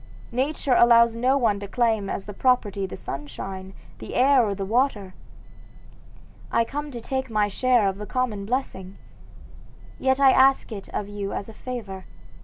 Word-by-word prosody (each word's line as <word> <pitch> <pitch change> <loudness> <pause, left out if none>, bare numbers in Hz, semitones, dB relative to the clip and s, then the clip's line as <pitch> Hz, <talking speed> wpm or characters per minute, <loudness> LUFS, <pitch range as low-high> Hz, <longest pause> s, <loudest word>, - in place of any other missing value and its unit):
Nature 265 +2 0
allows 235 -1 +5
no 255 +4 +2
one 220 -6 +1
to 200 - -7
claim 220 -3 0
as 195 - -4
property 205 -7 +1
the - - -8
sunshine, 190 +6 -7 0.2
the - - -8
air, 265 0 +5
or 205 -3 -1
the 195 0 -4
water. 215 -4 0 1.4
I 230 - +2
come 290 +4 -5
to 245 -4 -7
take 265 +2 -3
my 210 -2 +1
share 245 0 +2
of 195 +1 -3
the 210 - -6
common 220 -6 -2
blessing. 200 -7 -4 1.0
Yet 265 0 +1
I 270 -1 +6
ask 265 -1 +4
it 200 -3 -8
of 205 - -4
you 205 -1 -5
as 200 - -5
a - - -10
favor. 215 -6 -7
230 Hz, 165 wpm, -24 LUFS, 200-255 Hz, 1.4 s, I